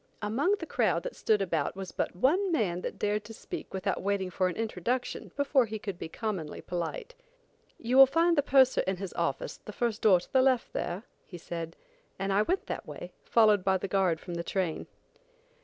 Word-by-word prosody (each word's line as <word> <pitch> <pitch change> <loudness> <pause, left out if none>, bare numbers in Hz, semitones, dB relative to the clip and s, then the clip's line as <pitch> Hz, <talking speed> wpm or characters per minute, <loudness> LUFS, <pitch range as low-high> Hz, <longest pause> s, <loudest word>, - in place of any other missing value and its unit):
Among 270 - +2
the 330 - -6
crowd - - +1
that - - -5
stood 210 -2 +2
about 190 - -1
was 190 -1 -6
but - - -2
one 350 - +2
man 185 - 0
that - - -5
dared 210 0 0
to 225 - -9
speak - - -7
without 190 - -2
waiting 195 -1 -1
for 185 +1 +1
an 180 - -3
introduction 225 +3 -2
before 280 -3 +3
he 220 0 -4
could 200 -4 -6
be - - -5
commonly 190 -7 -4
polite. 430 - -4 0.6
"You 245 +3 0
will 270 0 +10
find 335 +5 +3
the 290 - +4
purser 265 -2 +4
in 190 -1 0
his 190 0 -6
office - - -2
the - - -6
first 235 -4 -2
door 190 -5 +6
to - - -15
the 260 - +6
left 260 -2 +2
there," 180 +4 -3 0.2
he 180 - -9
said; 165 -1 -6 0.4
and 195 0 -1
I 200 - +4
went 365 - 0
that - - -5
way, - - -8
followed 215 -4 +4
by 190 0 +3
the 190 - -4
guard 185 -4 +1
from 175 - -8
the 170 0 -3
train. 180 -3 -2
210 Hz, 205 wpm, -29 LUFS, 185-260 Hz, 0.6 s, will